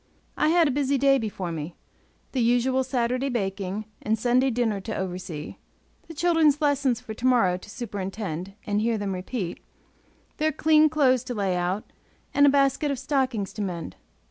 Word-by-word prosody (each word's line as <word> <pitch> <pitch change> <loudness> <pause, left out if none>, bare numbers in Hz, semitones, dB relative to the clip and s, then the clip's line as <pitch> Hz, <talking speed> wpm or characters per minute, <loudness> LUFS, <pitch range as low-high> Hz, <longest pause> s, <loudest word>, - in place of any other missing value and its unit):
I 305 - +2
had 335 -1 +4
a - - +1
busy 280 +1 +1
day 275 0 +4
before 200 -6 -4
me; 165 +1 -5 0.6
the 260 - 0
usual 245 +3 +2
Saturday 255 +1 -1
baking 200 -3 -3 0.2
and 220 +1 0
Sunday 250 +4 +2
dinner 225 -5 0
to 220 +3 -5
oversee, 180 -4 -5 0.5
the 330 - -10
children's 320 -3 +3
lessons 280 -5 +1
for 220 - -8
to 240 +4 -1
morrow 230 -8 +4
to 185 - -13
superintend 195 -5 -5
and 205 0 0
hear 230 0 +1
them 200 -2 -2
repeat, 185 0 -4 0.8
their 310 0 +1
clean 310 +1 +4
clothes 260 -5 +3
to 245 - -4
lay 195 -3 0
out, 180 +4 -2 0.4
and 285 0 +6
a - - +8
basket 275 +1 +2
of 280 - -1
stockings 260 -7 -1
to 215 - -5
mend. 170 - -4
240 Hz, 170 wpm, -25 LUFS, 195-275 Hz, 0.8 s, a